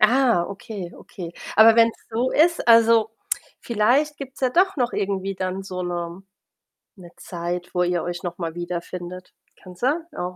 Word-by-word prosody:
Ah, 235 -4 +4
okay, 200 -2 -7
okay. 170 -3 -9 0.3
Aber 220 +1 +8
wenn's 230 -1 +4
so 240 +3 0
ist, 335 +3 +3
also, 230 -1 +6 0.5
vielleicht 245 +7 +2
gibt's 270 -1 -9
ja 255 - +2
doch 375 +5 +3
noch 245 -2 0
irgendwie 195 -1 -2
dann 185 +1 -3
so 185 -1 -5
'ne 175 +1 -4 0.8
'ne 175 -2 -13
Zeit, 175 0 -5
wo 180 0 +2
ihr 175 -1 0
euch 175 +1 -5
noch 175 -1 -4
mal 165 -2 -4
wiederfindet. 175 +1 -6 0.3
Kann 185 -1 -12
sein 275 - 0
auch, 180 0 -4
195 Hz, 160 wpm, -23 LUFS, 175-235 Hz, 0.8 s, Aber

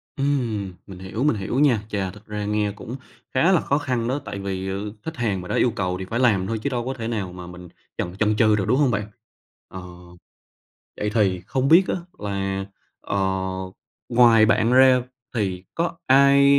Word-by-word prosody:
Ừm, 120 -9 -1
mình 95 -2 -10
hiểu, 95 +6 -4
mình 150 -5 +3
hiểu 105 +6 -2
nha. 130 -8 +4
Chà, 95 -3 -2
thật 105 +2 -16
ra 105 -1 -4
nghe 105 -1 0
cũng 110 +4 -8 0.4
khá 160 +8 +4
là 180 - +4
khó 140 - +1
khăn 125 -5 -1
đó. 130 +4 -1
Tại 100 - -5
vì, 95 -1 -3
ờ, 100 +2 -4
khách 160 0 -5
hàng 105 -6 -1
mà 90 - -9
đã - - -2
yêu 120 - +3
cầu 90 -3 -1
thì 95 - -4
phải 115 +5 -3
làm 105 -7 +3
thôi 110 +1 -2
chứ - - 0
đâu 120 -3 -2
có 130 - -2
thể 115 -3 -5
nào 100 -6 -3
mà 90 -1 -9
mình 90 0 -10 0.3
chần 90 +1 -3
chần 105 0 +2
chừ 110 -2 +4
được, 100 -2 -1
đúng 125 +4 +3
hông 140 -4 +3
bạn? 105 -2 -2 0.6
Ờ, 95 - -8 1.2
vậy 105 - -1
thì 95 -5 +2
không 130 +4 0
biết 170 +5 +7
á, - - 0 0.2
là, 95 -1 -2 0.4
ờ, 100 - -3 0.9
ngoài 115 -2 +6
bạn 115 +2 +3
ra 130 0 +6 0.3
thì 95 -5 -2
có 170 0 -1
ai 140 +1 +6
110 Hz, 205 wpm, -23 LUFS, 95-130 Hz, 1.2 s, biết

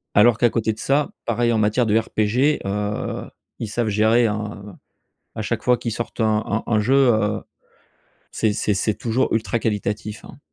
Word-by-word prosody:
Alors 110 +2 +6
qu'à 120 - +4
côté 110 -1 0
de 110 - -14
ça, 140 +4 +1
pareil, 120 0 +1
en 115 - +2
matière 110 +3 +2
de 110 0 +3
RPG. 115 +6 +1
Heu, 105 +1 -3 0.3
ils 115 - -3
savent 115 +1 -1
gérer, 110 +3 +3
hein, 105 -1 -4
heu, - - -9 0.6
à - - -3
chaque - - -3
fois 125 -1 +3
qu'ils 115 - -4
sortent 120 +2 -4
un 110 -1 +2
un 110 +2 -2
un 110 -2 +2
jeu, 115 +6 +1
heu, 110 -6 +3 0.9
c'est 110 -2 0
c'est 105 0 0
c'est 105 +2 0
toujours 120 +4 -1
ultra 115 +1 0
qualitatif, 105 -1 -3
hein. - - -12
110 Hz, 190 wpm, -22 LUFS, 105-120 Hz, 0.9 s, Alors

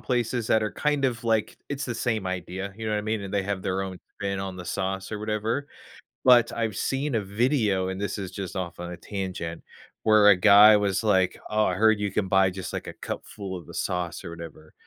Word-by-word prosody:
places 120 -2 -1
that 110 0 +3
are, 105 - -2
kind 150 -2 0
of, 120 -3 -1
like 110 -2 +1
it's 140 0 -3
the 120 - -3
same 110 -4 -1
idea, 95 +2 -4
you 110 0 -5
know 110 - -1
what 105 - +1
I - - -1
mean, 110 0 -2
and 100 0 -6
they 100 - +2
have 100 -1 -3
their 95 +1 -1
own 95 -1 -6 0.2
spin 100 -1 -2
on 95 -1 -4
the 90 - -7
sauce 95 +1 -3
or 105 - -4
whatever, 110 +6 -2 0.6
but 120 -2 +6
I've 110 -3 -2
seen 135 +2 -1
a 110 - +1
video, 105 -2 +1
and 95 0 -4
this 100 0 -2
is 95 -2 -5
just 95 -2 -6
off 90 -3 -4
on 90 0 -5
a 90 - -7
tangent 90 -4 -5 0.4
where 110 -1 +6
a 100 - +8
guy 105 +2 +8
was 100 0 0
like, 95 -4 +2
"Oh, 110 0 +2
I 90 - +1
heard 110 +2 +4
you 100 -1 -1
can 95 0 -1
buy, 95 0 +4
just, 95 0 -6
like, - - -4
a - - -7
cup - - -6
full 100 -3 -7
of 85 - -11
the - - -12
sauce 90 -2 -3
or - - -6
whatever." 85 -2 -10
100 Hz, 240 wpm, -26 LUFS, 95-110 Hz, 0.6 s, a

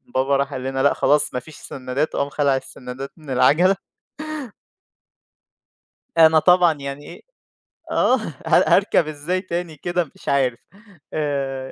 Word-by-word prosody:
بابا 135 +1 +2
راح 140 0 -1
قال 130 - -5
لنا: 135 0 -2
"لأ 145 - +4
خلاص 150 +1 +2
ما 125 - -1
فيش 155 +3 -14
سنّادات." 130 +3 -4
وقام 140 - -1
خَلَع 140 -1 +1
السنّادات 130 +1 -7
من 155 -3 -14
العَجَلة. 150 +9 +4 2.4
أنا 160 -1 +7
طبعًا 180 0 +5
يعني 140 0 -7
إيه - - -11 0.7
آه. - - +3 0.3
هار - - +4
هاركب 160 - +3
إزاي 155 +5 -3
تاني 175 -3 -4
كده 175 -1 -2
مش - - -7
عارف؟ 130 -4 +1 0.5
آآ 135 -3 -2
140 Hz, 140 wpm, -21 LUFS, 135-160 Hz, 2.4 s, أنا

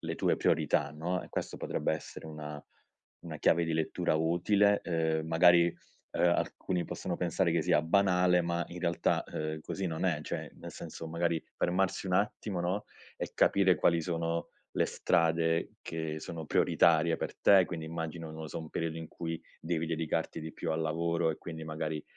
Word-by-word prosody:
le - - -3
tue - - +2
priorità, - - +2
no? 85 +4 -2
Ehm, - - -12
questo - - -4
potrebbe - - -1
essere 80 - -6
una 75 -1 -7 0.6
una 80 -2 -6
chiave 85 +3 +3
di 80 - -1
lettura 80 +1 0
utile, 100 +6 +3
uhm, 80 -2 0
magari, 85 +1 +6 0.5
uhm, - - -2
alcuni 90 0 0
possono - - -4
pensare 85 0 +1
che 85 - +2
sia 85 -2 +3
banale, 90 0 +3
ma, 85 0 -1
in 90 +1 -8
realtà, 85 -1 +1
uhm, 80 0 -3
così 95 +3 -4
non 80 +1 -3
è 85 -5 +1
cioè - - -5
nel - - -9
senso 80 - -7
magari 85 0 0
fermarsi 95 +2 0
un 90 - -1
attimo, 100 -2 -1
no, 90 +4 -1 0.3
e - - -5
capire 95 -2 +4
quali 85 +2 +3
sono 85 0 -2 0.2
le - - +1
strade 80 0 +1
che 80 -1 -4
sono 80 0 -6
prioritarie 80 +1 +4
per - - -5
te, 95 -2 +7
quindi 85 -3 -5
immagino, 80 0 -5
non 80 0 -8
lo 80 - -5
so, - - -4
un 80 - -8
periodo 80 -1 -2
in 80 - -6
cui 80 0 -5 0.2
devi 80 -1 -1
dedicarti 80 -1 -2
di 80 - -6
più - - -3
al 80 - -1
lavoro 85 +1 0
e, 80 - -2
quindi, 80 -2 -7
magari 80 -1 -3
85 Hz, 180 wpm, -31 LUFS, 80-85 Hz, 0.6 s, te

